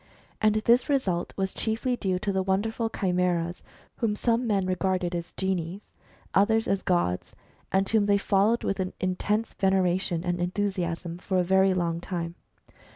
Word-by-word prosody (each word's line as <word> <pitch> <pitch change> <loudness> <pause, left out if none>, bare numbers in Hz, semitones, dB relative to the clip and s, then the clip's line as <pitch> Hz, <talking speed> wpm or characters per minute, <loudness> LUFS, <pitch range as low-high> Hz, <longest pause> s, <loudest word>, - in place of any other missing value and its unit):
And 215 -1 +4
this 240 +3 +4
result 190 -12 0
was 190 -1 -1
chiefly 230 +3 -1
due 190 -5 -1
to 200 +2 -2
the 190 -1 +1
wonderful 220 +4 0
chimeras, 180 -3 0 0.4
whom 220 -3 0
some 235 +2 +1
men 200 -3 +1
regarded 185 -1 0
as 170 -1 -4
genii, 190 0 -2 0.5
others 220 +3 +3
as 195 -1 +1
gods, 175 - 0 0.4
and 195 0 +2
whom 215 -2 +2
they 200 0 +4
followed 205 +3 +2
with 195 - -1
an 185 -1 -2
intense 205 +4 -1
veneration 185 -3 +1
and 175 -1 -1
enthusiasm 175 -2 -2
for 185 +1 -1
a 180 - +3
very 190 +1 +3
long 170 -2 0
time. 170 -2 -4
190 Hz, 155 wpm, -27 LUFS, 180-210 Hz, 0.5 s, And